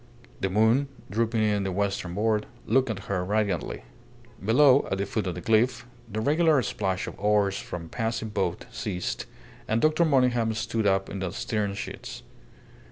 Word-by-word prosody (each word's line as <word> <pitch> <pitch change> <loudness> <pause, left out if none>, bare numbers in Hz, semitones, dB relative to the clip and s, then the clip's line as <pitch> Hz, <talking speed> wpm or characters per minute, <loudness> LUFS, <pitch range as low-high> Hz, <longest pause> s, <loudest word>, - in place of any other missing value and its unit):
The 95 - 0
moon, 110 +8 +3 0.2
drooping 115 +1 +1
in 105 -2 +1
the 95 - -2
western 95 -2 -2
board, 105 0 +1 0.2
looked 130 +2 +2
at 105 -3 -4
her 95 -2 -1
radiantly. 100 - -1 0.6
Below, 130 +5 +5
at 95 - +1
the 100 - -1
foot 105 0 -2
of 90 - -2
the 90 - -6
cliff, 115 +4 +2 0.3
the 110 - -2
regular 155 +1 +3
splash 95 -3 -2
of - - -8
oars 100 -1 +2
from 85 -1 -6
a - - -12
passing 115 -1 -2
boat 95 -4 -2
ceased, 90 0 -3 0.4
and 110 - +1
Dr. 155 +5 +3
Monygham 125 -7 +2
stood 110 -1 -1
up 95 0 +2
in 100 - -5
the 95 -1 -2
stern 100 +1 -2
sheets. 100 - -7
105 Hz, 170 wpm, -27 LUFS, 95-115 Hz, 0.6 s, Below